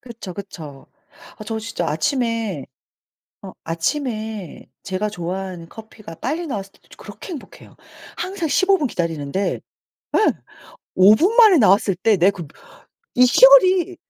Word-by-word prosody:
그렇죠, 230 -7 -10
그쵸. 155 -8 -10 0.6
저 225 0 -3
진짜 220 -6 -4
아침에 230 - -2 0.8
어 - - -9
아침에 215 - -4 0.2
제가 190 +2 -3
좋아하는 180 -2 -6
커피가 220 -5 -12
빨리 315 - -4
나왔을 200 -8 -6
때도 - - -28
저 - - -15
그렇게 205 -1 -12
행복해요. 295 - -12 0.4
항상 360 -2 -4
15 385 +5 +2
분 290 - -1
기다리는데 165 - -3 0.6
예 - - +3 0.8
5 190 +3 +7
분 370 - +1
만에 435 -6 +7
나왔을 200 -3 +3
때 210 +3 +2
내 185 +4 +4
그 175 -5 -9 0.7
이 250 0 +5
시골이 375 - +5
215 Hz, 260 characters per minute, -20 LUFS, 185-285 Hz, 0.8 s, 5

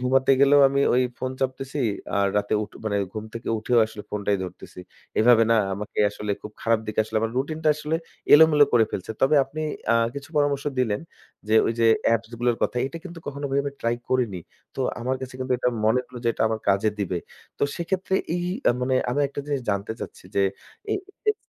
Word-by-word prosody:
ঘুমাতে 130 +1 +2
গেলেও 140 +1 +6
আমি 140 0 0
ওই 130 - +4 0.2
ফোন 130 - -2
চাপতেছি, 135 +2 -2 0.4
আর 100 - +3
রাতে 105 +1 +1
উঠ 105 - -7
মানে 100 -2 0 0.2
ঘুম 110 0 -5
থেকে 115 - -6
উঠেও 120 +2 +2
আসলে 110 -1 -9
ফোনটাই 100 -1 0
ধরতেছি। 90 - -10 0.4
এভাবে 115 0 +6
না 115 - +5 0.2
আমাকে 105 +1 -7
আসলে 105 0 -5
খুব 105 - -7
খারাপ 115 -1 +2
দিকে 110 - -6
আসলে 110 - -4
আমার 115 0 -1
routine-টা 155 +3 -1
আসলে 155 +1 -1 0.4
এলোমেলো 150 -1 +7
করে 115 -2 +5
ফেলছে। 95 - -5
তবে 135 +3 +4
আপনি 150 +4 -7 0.3
আ - - +4 0.2
কিছু 140 +2 -7
পরামর্শ 145 -1 +1
দিলেন 110 -3 +1 0.5
যে 110 - +3
ওইযে 115 0 +1 0.3
appsগুলার 115 +1 -1
কথা। - - 0
এটা 165 +4 -7
কিন্তু 170 -2 -8
কখনো 145 0 -5
ভাই 135 - +1
আমি 140 - -3
try 115 +1 0
করিনি। 115 -8 0 0.4
তো - - -3 0.2
আমার 130 +2 -1
কাছে 130 0 -7
কিন্তু 130 0 -1
এটা 125 - +1 0.2
মনে 110 +4 +3
হলো 125 -1 -10
যে - - +3
এটা - - -2
আমার 110 -1 -2
কাজে 100 +2 +3
দিবে। 90 -3 -1 0.4
তো - - -4
সেক্ষেত্রে 185 +2 -2 0.2
এই 175 0 -1 0.4
মানে 130 +1 +1 0.2
আমি 145 - 0
একটা 140 - -5
জিনিস 140 -2 -1
জানতে 100 +2 -2
চাচ্ছি - - -8
যে 100 - +4 0.5
এই - - +2 0.3
এস 425 - -3
125 Hz, 200 wpm, -24 LUFS, 110-140 Hz, 0.5 s, এলোমেলো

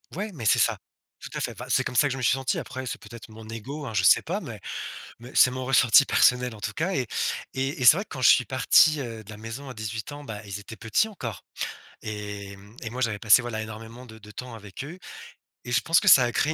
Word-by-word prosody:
Ouais, 210 +3 -3
mais 120 -8 -8
c'est - - +4
ça, - - +2 0.4
tout - - -8
à - - -2
fait! - - -3
Enfin, - - -9
c'est - - +2
comme 125 - -4
ça 145 - +4
que - - -3
je 135 - -3
me - - -5
suis 125 - +3
senti, 135 -1 -1
après, 130 0 -6
c'est - - -4
peut-être 115 -3 -12
mon 110 0 -12
ego, 135 +7 -7
hein, 115 - -6
je 95 -3 +1
sais 85 - +6
pas, - - -3
mais - - -8 0.6
mais 120 +3 -12
c'est 125 - +6
mon 130 0 -5
ressenti 130 +1 +6
personnel, 125 -1 +3
en 105 - -12
tout 105 0 -3
cas. 170 - -1
Et 130 -5 -1 0.5
et 135 +1 -2
et - - +1
c'est 155 - +9
vrai 200 - -2
que - - -29
quand 130 - -6
je - - +7
suis 125 - +5
parti, 145 +5 +4
heu, 115 -3 -7
de 105 - -17
la 105 - -9
maison 115 +5 -8
à - - -7
18 110 +2 -5
ans, 145 0 -8
bah, 110 -5 -7
ils 100 0 -6
étaient 110 +2 -10
petits 115 - +1
encore 120 - -7 0.6
et 105 -2 -6
mmh 105 +4 -17
et 110 - -4
moi 125 +2 -6
j'avais 110 -4 0
passé, 110 +4 +5
voilà, 115 -2 -4
énormément 115 +3 -9
de 110 -1 -13
de 105 0 -14
temps 125 +3 -8
avec 105 +4 -9
eux. 175 +5 -9 0.7
Et 125 - -4
je - - +3
pense 165 +1 +4
que - - -4
ça 130 - +8
a 120 - 0
créé 155 +6 +1
120 Hz, 275 wpm, -26 LUFS, 110-130 Hz, 0.7 s, c'est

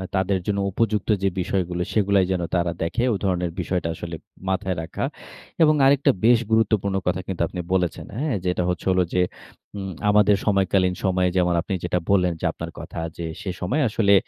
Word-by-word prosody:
তাদের 95 0 +1
জন্য 100 -1 0
উপযুক্ত 105 0 0
যে 95 - +4
বিষয়গুলো 90 -1 -1
সেগুলাই 100 -2 +3
যেন 90 -2 0
তারা 85 -1 +1
দেখে। 85 +9 0
ওই - - 0
ধরণের 90 -3 0
বিষয়টা 90 -1 -1
আসলে 85 0 -6 0.3
মাথায় 95 0 -1
রাখা। 80 - -5 0.6
এবং 155 -1 +5
আরেকটা 140 0 +5
বেশ 120 0 +6
গুরুত্বপূর্ণ 105 -3 +2
কথা 90 - +1
কিন্তু 95 -3 -3
আপনি 90 - -7
বলেছেন, 90 -3 0
হ্যাঁ? 140 -3 0
যেটা 90 0 +1
হচ্ছে 90 - -3
হলো 90 0 +3
যে 90 - +3 0.6
উম 95 -1 -4 0.2
আমাদের 105 0 +5
সময়কালীন 95 -2 +2
সময়ে 95 -2 +2
যেমন 90 -1 +3
আপনি 95 - -4
যেটা 90 0 0
বললেন 90 -3 +3
যে - - -2
আপনার - - -7
কথা - - -9 0.2
যে 85 - -4 0.2
সে 95 - -4
সময় 125 +13 0
আসলে 105 -1 +3
95 Hz, 180 wpm, -23 LUFS, 90-105 Hz, 0.6 s, বেশ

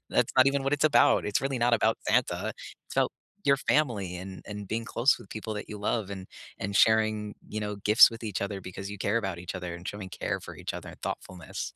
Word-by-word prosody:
that's - - +2
not 130 +1 +7
even 140 0 +2
what 135 - 0
it's 145 +1 +1
about, 120 -6 +5
it's 105 - +1
really 135 -1 -1
not 120 0 +4
about 110 0 +2
Santa, - - +1 0.3
it's - - -10
about - - +3 0.3
your 140 0 +5
family 115 -12 +1
and 95 +1 -8
and 105 -1 -7
being 115 +2 -2
close 120 +4 +2
with 95 - -14
people 110 0 -5
that 105 - -6
you 105 -1 -6
love 105 -1 -1
and 95 -1 -6 0.3
and 100 0 -4
sharing, 110 -1 +3
you 110 - -4
know, 105 -1 -3
gifts 105 +4 +7
with 115 0 -9
each 105 -3 -3
other 100 -1 -3
because 95 +2 -7
you 100 - -7
care 105 +3 0
about 95 -5 -3
each 90 +2 -6
other 90 -2 -5
and 85 +1 -9
showing 100 -2 -6
care - - -3
for - - -10
each - - -5
other - - -7
and - - -15
thoughtfulness. 90 -5 -5
105 Hz, 240 wpm, -28 LUFS, 95-115 Hz, 0.3 s, not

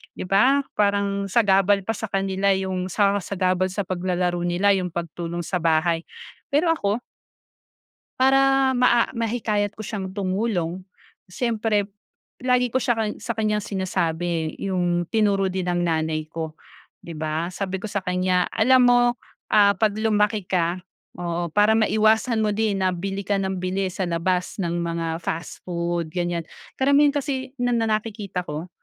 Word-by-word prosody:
di - - -5
ba, 260 +10 +4
parang 200 -1 +1
sagabal 195 -2 +3
pa 225 - -1
sa 220 0 -5
kanila 195 0 +1
yung 190 -1 -2
sa 200 +1 +2
sagabal 185 -1 0
sa 200 +2 -2
paglalaro 180 -1 -1
nila 175 +3 +2
yung 185 -2 0
pagtulong 170 0 -4
sa 180 - -1
bahay. 165 +1 +2 0.5
Pero 320 +4 +3
ako 210 -4 -1 1.2
para 270 0 +4
maa 240 -1 +4
mahikayat 215 -3 -1
ko 215 - -9
siyang 195 -3 -5
tumulong, 190 -3 -2 0.4
siyempre 215 0 -1 0.5
lagi 250 -1 +2
ko 250 - 0
siya 245 -2 +1
kang 215 -2 -1
sa 235 - -4
kanyang 215 -2 0
sinasabi 170 -4 -2
yung 175 -3 0
tinuro 200 -3 +2
din 185 -1 -3
ng 175 0 0
nanay 160 -2 -1
ko, 160 -1 -5 0.5
di 170 - -7
ba? 160 +2 -3
Sabi 190 0 -3
ko 195 - -10
sa 200 0 -2
kanya, 180 -1 +1
"Alam 255 +4 +4
mo, 245 0 +5 0.5
ah, 200 -2 +5
'pag 215 +1 +2
lumaki 210 -1 +2
ka," 175 0 0 0.4
oo, 170 -1 -3
"para 210 +4 +4
maiwasan 220 +1 +3
mo 215 - +1
din 210 -2 0
na 185 -1 +1
bili 195 +2 -4
ka 205 - +2
nang 190 -1 -2
bili 185 +1 -1
sa 185 0 -2
labas 180 +2 -1
ng 175 -4 -2
mga 165 -1 -2
fast 165 +1 -5
food," 170 -1 -2
ganiyan. 175 0 -2 0.3
Karamihan 280 +2 +4
kasi 265 -2 -3
na 245 0 +1
na 225 - +1 0.2
nakikita 205 -4 -5
ko, 155 +4 -5
195 Hz, 155 wpm, -23 LUFS, 175-215 Hz, 1.2 s, mo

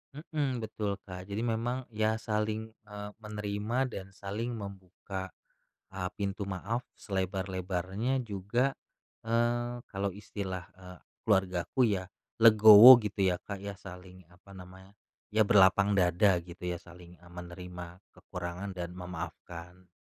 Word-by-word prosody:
Mhm, 145 -5 -3
betul, 105 -2 -3
Kak. 90 -1 -9
Jadi 100 +3 -3
memang 120 +2 -1
ya 110 0 +1
saling, 110 0 -2 0.2
eee, 105 0 -7
menerima 105 +2 -3
dan 95 - -6
saling 110 +5 -4
membuka, 95 -2 -7 0.6
eee, 95 -1 -3
pintu 100 0 -2
maaf 100 +6 -3
selebar-lebarnya 95 +5 -2
juga, 110 +6 0 0.6
eee, 120 +1 0
kalau 100 0 -1
istilah, 95 -3 -6
eee, 90 -1 -12 0.3
keluargaku 95 +3 +2
ya 95 -3 -1 0.3
legowo 110 +2 +11
gitu 105 -1 -3
ya 90 - -3
Kak 100 -1 -7
ya, 100 0 -5
saling 90 -1 -12
apa 90 +3 -19
namanya, 95 +1 -13 0.4
ya 110 0 +5
berlapang 100 0 +5
dada 90 +1 +4
gitu 85 +1 -12
ya 90 -1 -2
saling 85 0 -15
e 90 - -20
menerima 90 0 -9 0.2
kekurangan 90 +2 -6
dan 85 -1 -4
memaafkan. 90 0 -8
100 Hz, 125 wpm, -30 LUFS, 90-110 Hz, 0.6 s, legowo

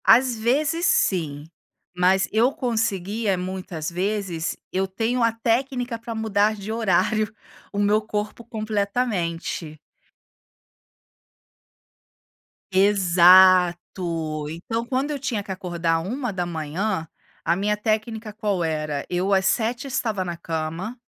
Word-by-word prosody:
Às 245 +1 +5
vezes 295 +9 +1
sim, 150 -6 +1 0.5
mas 185 +2 +3
eu 235 +4 +3
conseguia 220 -4 -1
muitas 180 -3 -4
vezes. 185 -2 -2
Eu 190 +1 0
tenho 225 +6 -1
a 230 0 +4
técnica, 240 +1 -1
para 230 0 -6
mudar 215 -1 +1
de 205 +1 -6
horário, 215 0 +1 0.4
o 200 - -6
meu 205 +1 +3
corpo 210 +2 -4
completamente. 200 -8 -2 2.9
Exato, 180 -4 +4
então 225 +9 -4
quando 265 +4 -1
eu 290 - -3
tinha 240 -7 -2
que 195 - -7
acordar 170 -3 -1
1:00, 180 - -2 0.4
a 170 - +2
minha 205 +4 0
técnica 215 +1 -2
qual 205 -4 -1
era, 155 -3 -2
eu 185 +3 0
às 190 0 +3
19:00 235 +5 0
estava 220 -7 -1
na 175 -2 -5
cama, 165 +7 -4
200 Hz, 110 wpm, -23 LUFS, 175-225 Hz, 2.9 s, Às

